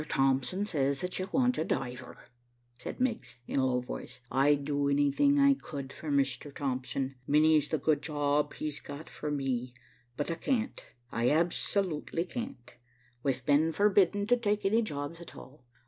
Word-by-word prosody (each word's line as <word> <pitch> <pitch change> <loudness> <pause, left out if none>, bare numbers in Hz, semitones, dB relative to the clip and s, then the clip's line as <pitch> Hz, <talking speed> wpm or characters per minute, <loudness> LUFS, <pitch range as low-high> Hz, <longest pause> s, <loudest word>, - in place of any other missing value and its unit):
Thompson 135 +9 +1
says 140 -6 0
that 180 0 -3
you 185 +1 -3
want 250 -1 +2
a - - +2
diver," 125 -5 -4 0.6
said 125 - -7
Miggs, 250 -3 -1
in - - -1
a 130 - +3
low 125 -1 +1
voice. 125 0 -7
"I'd 140 +1 +3
do 145 -1 +1
anything 145 - +3
I 280 0 +6
could 140 - -7
for 155 - -7
Mr. 140 0 0
Thompson. 135 -1 -2
Many's 155 0 +4
the 155 - 0
good 150 0 +1
job 145 -1 0
he's 150 -1 -4
got 145 +3 -9
for 150 - -5
me, 130 -4 -2 0.4
but 145 +3 -1
I - - -1
can't, 245 +3 -1 0.3
I 120 +1 +1
absolutely 170 +1 0
can't. 235 - -7 0.5
We've 130 -1 -1
been 150 +3 +4
forbidden 200 +2 +3
to 245 +3 +4
take 210 -3 0
any 220 +4 +4
jobs 150 -4 -4
at 170 - -11
all. 130 -1 -13
150 Hz, 165 wpm, -30 LUFS, 135-185 Hz, 0.6 s, I